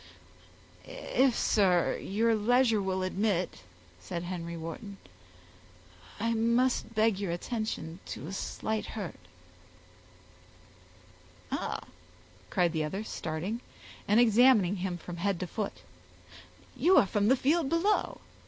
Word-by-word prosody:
"If, 260 -2 0
sir, 185 -5 +3
your 225 +4 +1
leisure 230 0 +3
will 190 -1 -1
admit," 185 - -1 0.4
said 90 - -5
Henry 170 -1 -5
Wharton, 180 +5 -7 1.2
"I 230 0 +1
must 235 +1 +1
beg 215 -2 +3
your 195 -4 -2
attention 175 -3 -4
to 115 - -6
a 180 - -6
slight 215 +2 -3
hurt." 195 -7 -5 2.3
"Ah!" - - -2 0.7
cried 175 -2 +2
the 160 -1 0
other, 190 +8 -3
starting, 180 +5 -4 0.5
and 210 +3 +4
examining 225 -4 +5
him 180 -1 -3
from 175 0 -8
head 190 0 0
to - - -1
foot, 205 +4 -5 0.9
"you 370 +3 +4
are - - +7
from 205 +1 +1
the 260 - +6
field 295 +3 +2
below. 365 +6 +1
205 Hz, 115 wpm, -30 LUFS, 175-230 Hz, 2.3 s, are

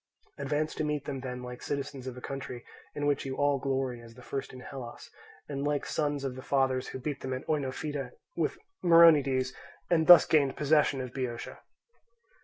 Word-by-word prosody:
Advance 155 +1 -1
to - - -2
meet 150 -2 -2
them 135 -2 -4
then 125 -1 -6
like 125 0 -8
citizens 140 -2 -4
of 125 -1 -6
a - - -8
country 130 -3 -6 0.3
in 145 - -2
which 145 -1 +1
you 135 -1 -4
all 145 0 +2
glory 130 -3 -2
as 115 -1 -14
the 125 - -13
first 135 +1 -4
in 130 - -10
Hellas, 125 -3 -9 0.4
and 140 -1 -3
like 145 0 0
sons 145 -2 -1
of 135 -2 -2
the 130 - -7
fathers 130 -1 +1
who - - -6
beat 135 +2 -4
them 130 - -3
at 130 - -5
Oenophyta 145 0 -2 0.3
with - - -1 0.3
Myronides 145 -7 +6 0.4
and 160 -2 +3
thus 175 -2 +10
gained 140 -4 +2
possession 150 -2 +3
of 125 -1 -6
Boeotia." 125 -3 -4
135 Hz, 190 wpm, -30 LUFS, 130-145 Hz, 0.4 s, thus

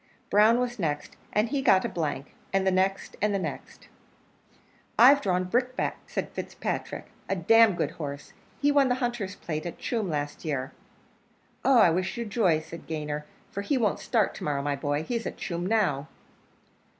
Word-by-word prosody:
Brown 215 +4 +5
was 245 -2 -2
next, 150 -5 -2 0.2
and 210 +2 +1
he 280 -1 0
got 190 -8 +4
a - - +2
blank; 150 -4 -3 0.2
and 195 0 +1
the 190 - +4
next, 190 +1 0
and 210 -1 +2
the - - +2
next. 190 - -6 1.1
"I've 275 +4 +8
drawn 185 -6 +1
Brickbat," 250 +7 0
said - - -3
Fitzpatrick, - - -5 0.2
"a 195 - +1
d 175 - -6 0.2
d - - 0
good 155 -4 -1
horse; 145 -3 -7 0.3
he 290 0 +3
won 280 -2 +4
the 250 - +2
hunters' 240 -6 -2
plate 155 -2 -4
at 170 - -7
Tuam 220 -6 -2
last 145 -2 -3
year." 135 -5 -2 0.9
"Oh! 270 -2 +5
I 210 -7 +7
wish 185 +6 -1
you 235 - -2
joy," 195 -8 +2
said 160 +1 -10
Gayner, 150 -1 -3 0.3
"for 200 - -3
he 265 +7 0
won't 215 -5 +1
start 225 -4 +1
to - - -8
morrow, 140 -2 -1
my 145 0 0
boy: 145 +2 -1
he's 235 +4 -2
at - - -6
Tuam 175 -1 -3
now." 185 -10 +1
190 Hz, 185 wpm, -27 LUFS, 155-235 Hz, 1.1 s, I've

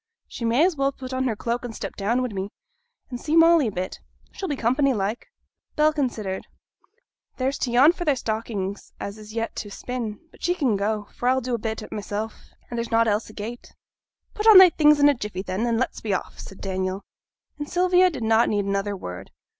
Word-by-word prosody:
She 235 - -6
may 240 +8 +4
as 365 -2 +1
well 275 -1 +1
put 260 -1 -8
on 260 0 0
her 235 -4 0
cloak 235 +3 -2
and 235 -2 -6
step - - -6
down 235 +6 0
wi' 250 - -2
me, 195 -2 -4 0.6
and 245 - -5
see 310 +1 0
Molly 330 -4 +6
a - - -2
bit; 185 0 -4 0.3
she'll 385 - -5
be 290 - 0
company 260 +2 +2
like.' 205 +3 -2 0.5
Bell 305 +1 +3
considered. 225 -10 -3 0.9
'There's 265 +2 -1
t' 245 - -1
yarn 270 +6 +7
for 350 0 -5
thy 295 -4 +2
stockings 215 -4 -4
as 200 +2 -6
is 215 +1 -11
yet 230 0 -2
to 205 - -5
spin; 230 0 -5
but - - -20
she 355 +1 +1
can 265 - +1
go, 205 +1 -1
for 245 - 0
I'll 260 +1 +3
do 255 -1 -4
a 235 - 0
bit 220 0 -4
at - - -11
't - - -5
mysel', 210 +1 -3 0.4
and 235 - -4
there's 235 - -3
nought 230 0 +3
else 215 +1 0
agate.' 220 +3 -8 0.6
'Put 425 +1 -1
on 435 -3 +10
thy 375 -2 +10
things 300 -1 +5
in 285 - +6
a 290 - +6
jiffy, 210 -7 -5
then, 195 +5 -2
and 230 -1 +1
let's 255 - -2
be 205 -3 0
off,' - - -6
said 195 - -10
Daniel. 190 0 -3 0.6
And 295 - -5
Sylvia 360 +1 +4
did 270 -9 -6
not 225 +1 +3
need 205 -1 0
another 200 0 -1
word. 90 - -8
235 Hz, 225 wpm, -24 LUFS, 210-275 Hz, 0.9 s, on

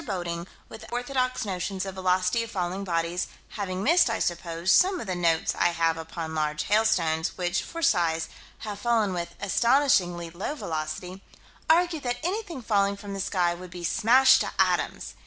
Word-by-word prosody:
Bodding, 175 -3 -4 0.2
with 220 - -11
orthodox 255 0 -1
notions 190 0 -3
of 195 - -5
velocity 185 +3 +1
of 230 - -5
falling 185 0 -3
bodies, 170 -1 -1 0.2
having 190 -2 -4
missed, 335 0 +4
I 225 - 0
suppose, 170 0 -1
some 370 0 +4
of - - -5
the 185 - -2
notes 170 -2 +1
I - - +2
have 165 -1 +1
upon 160 0 -6
large 150 -1 -1
hailstones, 190 -6 +1
which, 175 0 0
for 335 0 -7
size, 165 - +2 0.3
have 205 -2 -6
fallen 220 -3 +1
with 170 -1 -4
astonishingly 200 -7 +2
low 190 - -4
velocity, 180 - -5 0.5
argued 335 -1 +3
that 245 -2 -2
anything 355 - -3
falling 200 -2 +1
from 200 0 -8
the 195 - -3
sky 175 -2 +1
would 180 +1 -9
be 175 0 -9
"smashed 240 +8 +5
to - - -2
atoms." - - 0
190 Hz, 170 wpm, -26 LUFS, 175-230 Hz, 0.5 s, smashed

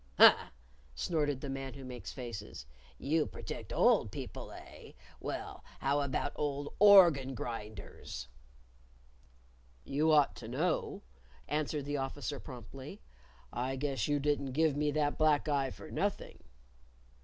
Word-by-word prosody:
"Huh!" - - +8 0.5
snorted 145 - 0
the 140 - -5
Man 135 0 -5
Who 135 -1 -9
Makes 125 -2 -7
Faces. 110 - -7 0.3
"You 155 - +1
protect - - -7
old - - +4
people, - - -7
eh? - - -12 0.3
Well, - - -5
how 140 +2 +1
about 140 -2 -1
old 145 -1 -2
organ 170 -10 +7
grinders?" 105 - -6 1.6
"You 150 +3 +1
ought 150 -2 +5
to 110 - -8
know," 155 +9 -1 0.4
answered 150 -1 -1
the 145 0 -2
Officer 140 +1 -3
promptly. 130 - -9 0.5
"I 130 +3 -1
guess 135 -5 -1
you 145 0 +2
didn't 140 -2 0
give 155 0 +3
me 150 0 +1
that 145 0 0
black 155 -1 +3
eye 140 -3 +1
for - - -10
nothing." - - -2
140 Hz, 130 wpm, -33 LUFS, 130-150 Hz, 1.6 s, Huh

